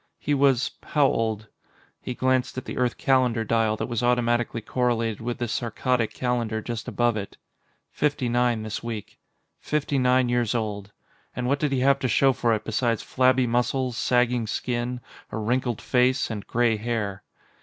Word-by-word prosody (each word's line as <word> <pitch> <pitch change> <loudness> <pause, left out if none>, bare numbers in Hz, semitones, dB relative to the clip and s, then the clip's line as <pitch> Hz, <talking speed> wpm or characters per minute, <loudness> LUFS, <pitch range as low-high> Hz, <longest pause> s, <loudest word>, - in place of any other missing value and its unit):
He 145 - -1
was 135 -3 +3
how 150 -3 +2
old? 110 -4 0 0.5
He 125 - -5
glanced 130 0 0
at 130 - -4
the - - -6
Earth 125 -1 0
calendar 130 -5 +2
dial 110 0 +1
that - - -2
was 120 -2 -2
automatically 120 -1 +1
correlated 115 -1 -1
with 120 +1 -3
the 120 - -2
Saarkkadic 115 +1 -1
calendar 120 -3 -1
just 115 0 -5
above 120 -1 +1
it. 100 -2 -6 0.5
Fifty 145 -4 0
nine 120 -2 +1
next 110 0 -4
week. 115 -3 -6 0.4
Fifty 150 -2 -1
nine 125 0 +3
years 120 -1 0
old. 105 -3 -3 0.4
And 125 - -3
what 140 +3 +1
did 150 -2 0
he 130 -2 +1
have 140 +1 +4
to 130 - 0
show 135 +3 +4
for 120 -2 +1
it 105 - -5
besides 115 0 0
flabby 130 0 +3
muscles, 125 +1 0
sagging 125 -2 +1
skin, 125 +2 -2 0.3
a - - -4
wrinkled 120 +1 -1
face, 125 0 +2
and 105 -2 -6
gray 120 -2 +2
hair? 105 -3 -3
120 Hz, 170 wpm, -25 LUFS, 115-130 Hz, 0.5 s, have